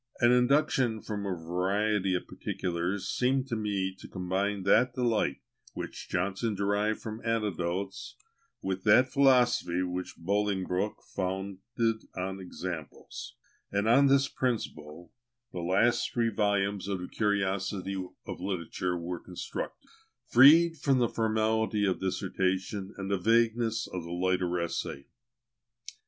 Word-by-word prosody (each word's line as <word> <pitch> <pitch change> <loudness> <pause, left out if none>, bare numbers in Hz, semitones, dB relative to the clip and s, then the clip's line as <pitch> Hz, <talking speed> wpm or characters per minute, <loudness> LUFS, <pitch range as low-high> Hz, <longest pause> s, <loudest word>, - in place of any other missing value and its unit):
An 120 -1 +5
induction 125 -2 +3
from 105 -2 -4
a 95 - -1
variety 95 +3 0
of 90 - -2
particulars 90 +2 -3
seemed 130 +1 +1
to 115 - -1
me 100 -3 -1
to - - -10
combine 95 +2 -2
that 120 +6 +4
delight, 115 - 0 0.3
which - - -6
Johnson 100 +4 -1
derived 105 +2 0
from 110 +1 -7
anecdotes, 100 -4 -2 0.5
with 95 0 -2
that 125 +5 +6
philosophy 125 -10 +3
which 90 0 -4
Bolingbroke 100 +1 -1
founded 100 +4 -2
on 95 +1 -3
examples; 90 -4 -7 0.4
and 100 +2 0
on 135 +5 +6
this 140 0 +4
principle 85 - -4 0.4
the 90 - -5
last 100 +8 +2
three 115 -1 +1
volumes 100 -2 0
of 100 -2 -2
the 90 - -5
"Curiosities 100 -2 -1 0.3
of - - -6
Literature" 90 -1 -2
were 85 +1 -4
constructed, 90 -1 -6 0.4
freed 160 +7 +7
from 135 -2 +2
the 120 -2 +2
formality 110 -1 +1
of 95 -2 0
dissertation, 95 +1 -1
and 95 0 -4
the 100 - +1
vagueness 115 +2 +2
of 90 -2 -6
the 85 - -9
lighter 90 0 0
essay. 80 -4 -3
100 Hz, 125 wpm, -29 LUFS, 90-115 Hz, 0.5 s, freed